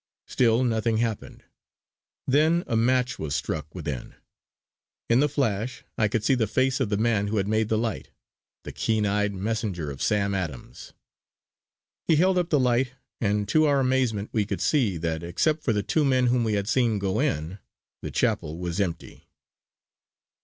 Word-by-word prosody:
Still 120 0 +2
nothing 115 -2 +1
happened. 115 -2 -3 0.8
Then 155 +6 +3
a 115 - -2
match 125 +1 +1
was 75 -3 -3
struck 75 +2 -4
within. 75 -8 -5 1.0
In 120 - +5
the 150 +1 +3
flash 125 -4 -2
I 110 - +2
could 110 0 -1
see 135 - +3
the 120 -4 +1
face 130 +5 +1
of 130 -6 0
the 105 - 0
man 110 -2 +1
who 110 +1 -1
had 100 -1 0
made 110 0 +1
the 110 - +2
light 110 -1 -3 0.5
the - - -7
keen 110 -2 0
eyed 105 0 +1
messenger 95 -6 -3
of 70 - -9
Sam 100 -2 +1
Adams. 85 -10 -6 1.1
He 165 - +4
held 185 +3 +3
up 175 -1 -1
the 150 - +3
light, 125 0 +1 0.3
and 105 -2 0
to 155 0 +4
our 140 -2 +3
amazement 130 -6 0
we 110 - +2
could 100 - -4
see 120 - +1
that, 80 -1 -2
except 150 - 0
for 125 - 0
the 105 -2 0
two 155 - +1
men 130 -2 +3
whom 125 -2 +2
we 110 -2 0
had 100 -1 -1
seen 120 -2 +2
go 100 +1 -1
in, 80 +6 -1 0.4
the - - -5
chapel 75 +2 -1
was 85 +1 -4
empty. 85 -4 -5
110 Hz, 175 wpm, -25 LUFS, 100-130 Hz, 1.1 s, In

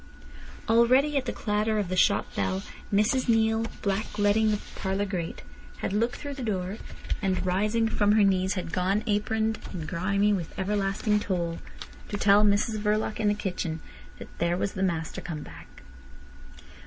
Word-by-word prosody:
Already 255 +6 +4
at 270 -2 +1
the - - -1
clatter 215 +1 0
of 205 -3 0
the 185 - -2
shop 200 +2 +3
bell 95 -1 -1 0.3
Mrs 215 +6 +2
Neale, 225 0 +3 0.2
blackleading 205 +1 +1
the 210 - +2 0.2
parlour 195 +1 -1
grate, 180 -4 -4 0.3
had 190 - -3
looked 230 +4 +1
through 285 -1 -6
the 270 - -7
door, 195 -3 -2 0.4
and 190 -2 0
rising 210 +5 +1
from 205 -2 +2
her 215 -1 +5
knees 190 0 +2
had 180 -3 -4
gone, 190 +3 +1
aproned, 220 +1 0
and 165 -5 -5
grimy 200 +5 +1
with 175 -5 -4
everlasting 200 +1 0
toil, 175 -4 -2 0.5
to 205 - -2
tell 200 +1 +5
Mrs 210 +1 +2
Verloc 210 +1 0
in 215 - +1
the 205 - +3
kitchen 175 -5 -3 0.4
that - - -11
"there 170 +1 +1
was 195 - -1
the 190 - -4
master 165 -4 -1
come 155 -4 -5
back." - - -13
205 Hz, 165 wpm, -27 LUFS, 185-220 Hz, 0.5 s, her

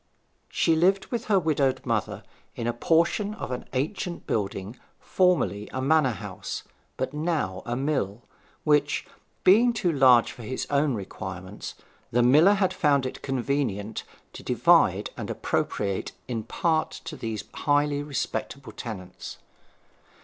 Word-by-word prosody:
She 165 - +2
lived 190 +4 +3
with 235 -2 -2
her 205 -2 +3
widowed 150 -6 +1
mother 115 -5 -1 0.3
in 115 - -4
a 120 - 0
portion 170 - +1
of 130 - -6
an 125 - -4
ancient 170 +6 -2
building 100 +1 -3 0.2
formerly 175 - +1
a 130 - -3
manor 145 +1 +3
house, - - -6 0.3
but 130 - -2
now 150 - -1
a 120 - -1
mill, 125 -6 -1 0.4
which, 150 -1 +2 0.4
being 235 +6 +6
too 180 -6 +1
large 130 -5 +5
for 125 - -11
his 130 +3 -3
own 140 -2 +2
requirements, 95 -1 -7 0.3
the 120 +1 +2
miller 150 +11 +6
had 190 -2 +1
found 140 -3 +2
it 130 - -5
convenient 125 -6 -1 0.3
to - - -9
divide - - +3
and - - -6
appropriate 100 -2 -2
in 115 -4 -3
part 160 +4 +1 0.2
to 160 - -5
these 115 -5 -4
highly 145 -1 +1
respectable 140 -1 -4
tenants. 95 -6 -8
135 Hz, 135 wpm, -26 LUFS, 115-160 Hz, 0.4 s, being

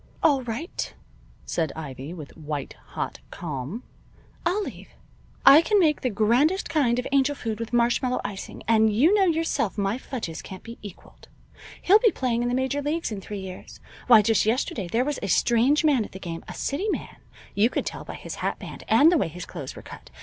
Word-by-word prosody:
"All 280 -4 +4
right," 245 - -5 0.5
said 160 -4 -1
Ivy, 140 -2 -7
with 155 -5 -9
a - - -16
white 150 -2 -5 0.2
hot - - -3
calm. 155 - -5 0.6
"I'll 400 +4 +1
leave. - - -8 0.6
I 280 +4 +10
can 415 +4 +2
make 310 -5 +3
the 255 - 0
grandest 245 - +2
kind 250 -7 +2
of 250 - -2
angel 280 +1 +3
food 225 -5 -4
with 230 -1 -5
marshmallow 240 +1 +2
icing, 200 -1 -6
and 220 -1 +4
you 275 - +4
know 405 -2 +4
yourself 325 - 0
my 200 +4 0
fudges 225 -13 -5
can't 190 -1 -10
be 230 0 -10
equaled. 205 -4 -13 0.6
He'll 405 +4 +6
be 455 - +5
playing 250 - -1
in 240 - 0
the 245 - 0
major 265 +2 0
leagues 300 0 -2
in 205 -2 -5
three 205 0 -6
years. 185 -1 -9 0.3
Why 225 -4 +8
just 220 0 +3
yesterday 220 -3 -1
there 235 +8 +1
was 295 -1 -2
a 200 - -3
strange 240 - +3
man 275 -7 +4
at - - -11
the 190 - -8
game 165 -3 -6
a - - -7
city 370 +10 -2
man, - - -4 0.4
you 215 +3 +3
could - - -2
tell - - -5
by - - -8
his - - -7
hat - - -1
band, - - -9
and 310 +4 +6
the 345 - +3
way - - +1
his 170 +2 -8
clothes 135 - -7
were - - -10
cut. - - -12
235 Hz, 210 wpm, -25 LUFS, 195-285 Hz, 0.6 s, I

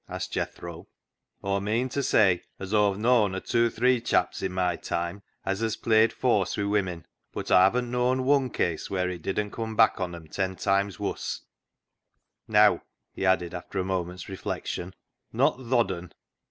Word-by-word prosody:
asked - - -5
Jethro. 85 +1 -5 0.3
" - - -47
Aw 100 0 0
meean 110 +5 0
to 140 - -1
say 95 -9 +3 0.2
as 95 +2 -6
Aw've 105 -2 +3
known 110 -3 +3
a - - -2
tooathre - - -21
[two 115 0 +3
or - - -2
three] 125 +2 +2
chaps - - +1
i' - - 0
my 90 -1 0
time 85 +4 -3 0.2
as 95 0 -1
hez 115 -1 -1
played 110 0 +3
fawse 105 -7 +1
wi' 100 - 0
women, 95 -5 -1 0.3
but - - -5
Aw 95 +1 +7
hav'n't 125 +2 -2
known 125 +1 +1
wun 135 -1 +3
case 85 -8 -2
wheer 90 -1 0
it 90 -2 -7
didn't 100 +4 -2
cum 110 -1 -4
back 110 0 +4
on 90 -2 -3
'em 85 -1 -10
ten 95 +3 -2
times 100 +2 0
wus. 100 - -3 1.1
Neaw," - - +5 0.3
he 95 - -1
added, 90 -2 +2
after 90 +2 -7
a 95 - +1
moment's 90 -1 -3
reflec 95 -1 -5
tion, 90 +1 -5 0.2
" - - -53
not - - +2
th' 130 -2 -11
odd 115 -6 +3
un." 90 -1 -6
100 Hz, 195 wpm, -27 LUFS, 90-115 Hz, 1.1 s, Aw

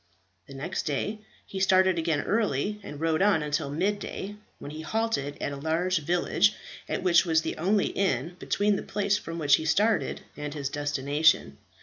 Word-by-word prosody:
The 140 - -11
next 140 +5 -4
day 205 +9 -2 0.3
he 195 - -6
started 190 -2 +4
again 160 -3 0
early, 210 -2 0
and 145 -6 -8
rode 160 +1 +1
on 195 -6 +3
until 150 -1 -1
mid 190 +8 0
day, 205 0 -6 0.2
when 145 - -8
he 155 +1 -7
halted 160 -6 -1
at - - -2
a - - -4
large 165 +4 0
village, 175 +6 +2 0.3
at - - -2
which 175 -2 +5
was 160 -3 +2
the - - -3
only 195 +4 +2
inn 170 -3 -1
between 205 0 +1
the - - -3
place 205 0 0
from 165 0 -7
which 145 -3 +4
he 160 - -5
started 210 +7 +1
and 150 0 -5
his 140 -2 -3
destination. 145 - +1
165 Hz, 185 wpm, -27 LUFS, 145-200 Hz, 0.3 s, which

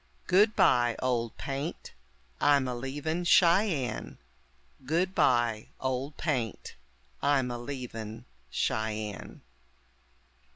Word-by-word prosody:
Goodbye, 180 - +4
Old 120 -3 -1
Paint, 140 +4 -5 0.5
I'm 140 -2 +4
a 125 - -2
leavin' 145 +7 -3
Cheyenne. 170 - +3 0.7
Goodbye, 125 - +1
Old 130 +2 -3
Paint, 125 - -2 0.5
I'm 140 -3 +2
a 120 - -4
leavin' 120 -3 -7 0.2
Cheyenne. 110 - -3
130 Hz, 80 wpm, -29 LUFS, 120-155 Hz, 0.7 s, Goodbye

